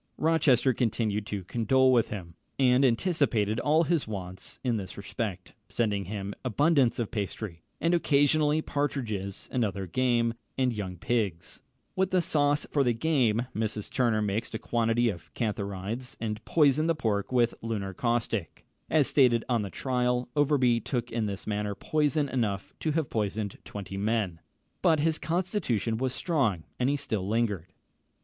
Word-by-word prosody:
Rochester 145 -5 +3
continued 110 -3 -1
to 100 -2 -4
condole 130 +6 +3
with 120 -3 +3
him, 90 -5 -6 0.2
and 130 0 +4
anticipated 120 - +2
all 155 +5 +3
his 165 -4 0
wants 95 -3 -6
in 120 -3 +1
this 95 -2 -7
respect, 100 -2 -5 0.2
sending 105 -4 0
him 100 +1 -4
abundance 135 +1 +3
of 115 -3 -2
pastry, 100 -4 -4 0.2
and 170 +1 +2
occasionally 150 -1 +3
partridges 115 -9 -3
and 125 - +1
other 100 -2 -2
game, 120 +3 +1 0.2
and 130 -2 +2
young 95 -4 -5
pigs. 90 -6 -2 0.3
With 190 0 +1
the 185 - +3
sauce 145 -3 +2
for 140 - +3
the 120 -2 +2
game, 120 -5 +2
Mrs. 110 -1 -2
Turner 115 -4 +2
mixed 105 +3 -2
a - - 0
quantity 115 +1 +1
of 85 -5 -7
cantharides, 105 +2 -3
and 110 -1 -3
poisoned 155 0 +3
the 165 - +3
pork 110 -7 -1
with 120 -2 +3
lunar 105 -4 -3
caustic. 115 - -2 0.2
As 155 -2 +4
stated 125 -5 +4
on 120 -3 +1
the 100 - -4
trial, 125 +2 0
Overbury 135 -5 +3
took 120 +1 -3
in 115 -2 -1
this 100 -1 -5
manner 105 -1 -2
poison 150 +4 +1
enough 110 -8 -2
to 155 - -1
have 155 -4 -1
poisoned 105 -1 -2
twenty 95 -1 -7
men; 100 -4 0 0.4
but 160 -2 +4
his 160 +1 +1
constitution 160 - -1
was 130 +1 -1
strong, 125 - 0 0.2
and 125 +1 +2
he 145 - +2
still 105 -8 -2
lingered. 105 -6 -1
115 Hz, 155 wpm, -28 LUFS, 105-140 Hz, 0.4 s, and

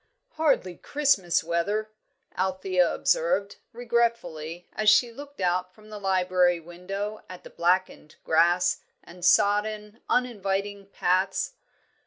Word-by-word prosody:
"Hardly 280 - 0
Christmas 205 - +1
weather," 200 +6 -1 0.4
Althea 185 -1 +1
observed, - - 0
regretfully, 230 -9 -2
as 215 -1 +3
she 235 +3 +4
looked 285 +4 -12
out 180 0 -1
from 215 0 -17
the 210 - -7
library 185 -2 +2
window 195 +5 -6
at 185 -1 -10
the - - -12
blackened 180 -3 0
grass 175 +3 +3 0.2
and 175 +1 -14
sodden, 210 +3 +2
uninviting 200 -4 -1
paths. 190 - 0
195 Hz, 110 wpm, -26 LUFS, 180-215 Hz, 0.4 s, she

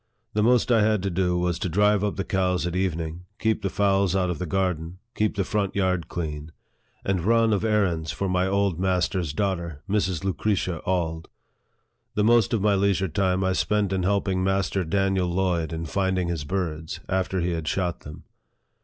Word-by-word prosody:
The 105 - +1
most 120 +2 +3
I 115 -2 +5
had 105 -2 +2
to 100 - -1
do 90 0 +1
was 90 -1 0
to 90 - -2
drive 105 +3 +3
up 105 - -1
the 95 - -2
cows 90 -4 0
at 90 0 -3
evening, 85 -2 -2
keep 110 -1 0
the 100 - -1
fowls 100 -1 +2
out 90 -2 +1
of 80 - -5
the 90 - -3
garden, 90 -1 -1 0.2
keep 110 0 0
the 100 - +1
front 100 +1 -1
yard 90 -4 0
clean, 75 -2 -5 0.5
and 95 -3 0
run 115 +1 +3
of 100 - 0
errands 95 -8 +1
for 100 - -2
my 90 0 +1
old 100 -3 +1
master's 90 -3 0
daughter, 85 -3 -2
Mrs. 95 -4 0
Lucretia 95 -3 -1
Auld. 80 -3 -1 0.9
The 105 - +2
most 115 -1 +4
of 110 -4 0
my 105 -1 +4
leisure 95 -1 +1
time 95 +3 +1
I 95 0 +1
spent 105 0 +1
in 95 - 0
helping 95 0 +1
Master 95 0 0
Daniel 95 +1 +1
Lloyd 85 -3 0
in 80 0 -4
finding 95 +1 0
his 80 -4 -3
birds, 80 -3 -3
after 95 0 0
he 90 +1 0
had 80 -2 -3
shot 90 -1 -1
them. 75 +1 -11
95 Hz, 190 wpm, -25 LUFS, 85-100 Hz, 0.9 s, I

